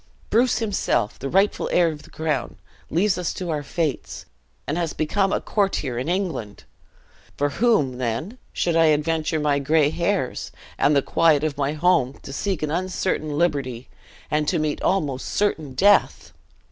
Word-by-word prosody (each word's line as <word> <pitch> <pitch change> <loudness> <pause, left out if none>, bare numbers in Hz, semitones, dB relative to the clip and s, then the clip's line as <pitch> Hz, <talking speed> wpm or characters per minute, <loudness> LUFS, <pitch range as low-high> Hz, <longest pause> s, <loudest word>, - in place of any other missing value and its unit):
Bruce 245 +3 +3
himself, 205 - -1
the 135 - -4
rightful 195 +5 +2
heir 175 -1 +4
of 150 -1 -9
the - - -16
crown, 155 -5 -3 0.3
leaves 185 +3 +1
us 175 - -1
to 180 -3 -3
our 150 -2 -1
fates, 150 0 -3 0.4
and 145 - -2
has 170 -2 -1
become 195 +5 0
a - - +1
courtier 155 - -1
in 130 - -3
England! 175 - -3 0.7
For 145 0 +1
whom, 145 - +1
then, 130 - -3
should 170 -2 0
I 165 0 +5
adventure 155 +1 +1
my 145 -1 +1
gray 150 +1 +2
hairs, 175 -4 -1 0.3
and 145 - +4
the 140 - +3
quiet 160 -3 +3
of 155 -3 -1
my 145 0 -1
home, 155 -5 +2
to 135 - -8
seek 190 +1 -2
an 150 - -1
uncertain 175 -4 -2
liberty, 135 -7 -1 0.4
and 150 0 +1
to 175 - +1
meet 155 -2 -1
an - - +1
almost 145 -9 -1
certain 160 -10 -1
death?" 205 +5 +3
155 Hz, 170 wpm, -23 LUFS, 145-180 Hz, 0.7 s, I